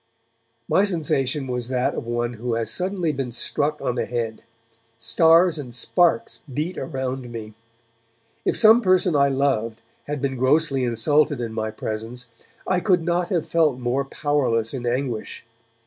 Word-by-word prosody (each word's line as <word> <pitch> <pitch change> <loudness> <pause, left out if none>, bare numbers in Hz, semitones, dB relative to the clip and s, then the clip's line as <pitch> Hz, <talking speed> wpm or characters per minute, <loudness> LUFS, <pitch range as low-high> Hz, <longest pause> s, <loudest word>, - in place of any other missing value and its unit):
My 195 - +3
sensation 150 -7 0
was 125 -2 -3
that 125 -1 0
of - - -5
one 120 0 -1
who 120 +1 -3
has 115 -1 -2
suddenly 180 - -1
been 135 -4 -4
struck 145 +5 -1
on - - -1
the 120 - -2
head; 115 -2 -3 0.6
stars 165 +8 +4
and 125 -5 -6
sparks 175 - +1
beat 155 +7 -3
around 130 -3 -4
me. 110 -2 -7 0.9
If - - 0
some 225 +2 +7
person 185 -4 +3
I 140 -1 +4
loved 130 -5 0 0.3
had 145 0 -4
been 135 -1 -2
grossly 135 +1 +2
insulted 145 +5 +2
in 115 -2 -4
my 110 0 -2
presence, 110 +3 -6 0.4
I 185 -1 +1
could 180 -3 +2
not 175 +1 0
have 175 -4 -1
felt 155 -6 +2
more 125 +2 -1
powerless 135 -5 0
in 125 -3 -4
anguish. 120 -2 -3
135 Hz, 155 wpm, -23 LUFS, 120-160 Hz, 0.9 s, some